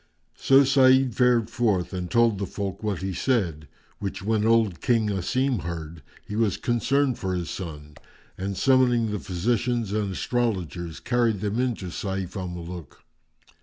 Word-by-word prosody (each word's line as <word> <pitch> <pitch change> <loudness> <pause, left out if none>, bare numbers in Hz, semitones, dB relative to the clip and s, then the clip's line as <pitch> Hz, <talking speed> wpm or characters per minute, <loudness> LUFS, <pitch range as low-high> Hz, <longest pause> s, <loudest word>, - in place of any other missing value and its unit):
So 135 +1 +5
Sa'id 130 -1 +4
fared 120 -1 +3
forth 110 -7 0
and 90 -1 -4
told 115 -4 +3
the 100 - -2
folk 100 -2 -5
what 100 -5 -2
he 95 0 -2
said; 85 - -1 0.3
which 100 -2 -5
when 110 +1 +1
old 110 -7 +2
King 115 -3 +2
Asim 125 +6 0
heard, 85 -2 -6 0.3
he 105 - -5
was 110 -3 +1
concerned 130 +2 +1
for 95 -1 -2
his 85 -2 -3
son 75 -5 -7 0.4
and, 95 0 -4
summoning 125 -4 +3
the 105 - -2
physicians 115 +4 -1
and 105 -2 -1
astrologers, 90 -8 -2
carried 120 -5 +1
them 105 +2 -1
in 125 -2 +1
to 90 -4 -7
Sayf 95 0 -4
al 95 -2 -3
Muluk. 85 -3 -8
105 Hz, 160 wpm, -25 LUFS, 90-120 Hz, 0.4 s, So